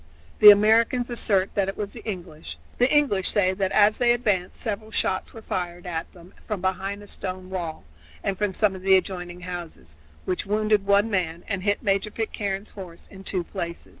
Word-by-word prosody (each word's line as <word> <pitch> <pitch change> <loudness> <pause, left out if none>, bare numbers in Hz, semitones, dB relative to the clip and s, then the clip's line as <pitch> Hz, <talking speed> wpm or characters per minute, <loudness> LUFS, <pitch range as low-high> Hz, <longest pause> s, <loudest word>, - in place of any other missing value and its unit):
The 210 - +11
Americans 225 +4 +5
assert 200 -5 +1
that 195 -1 +1
it 195 - -6
was 205 -1 -4
the 235 - -10
English; 170 - -7 0.2
the 250 +2 +4
English 275 -11 +3
say 190 -3 +2
that 190 0 -1
as 210 0 +4
they 240 -1 +4
advanced 205 -7 -1
several 215 -1 -4
shots 190 -3 -1
were 225 - -11
fired 175 -1 -4
at 165 -2 -4
them 175 0 -16
from 210 -3 -2
behind 190 +2 -2
a - - -13
stone 185 -1 -7
wall 170 -4 -4 0.4
and 195 - -1
from 200 -1 -2
some 210 -3 +2
of 190 - -8
the 190 0 +5
adjoining 180 -2 -5
houses, 175 - -8 0.3
which 180 - -1
wounded 210 -1 +1
one 200 +2 +3
man 175 -3 -1
and 200 -3 -2
hit 205 +1 0
Major 200 +1 +1
Pitcairne's 205 -2 -4
horse 180 -4 -10
in 195 -1 -11
two 185 -2 -2
places. 170 -2 -6
195 Hz, 195 wpm, -25 LUFS, 180-210 Hz, 0.4 s, The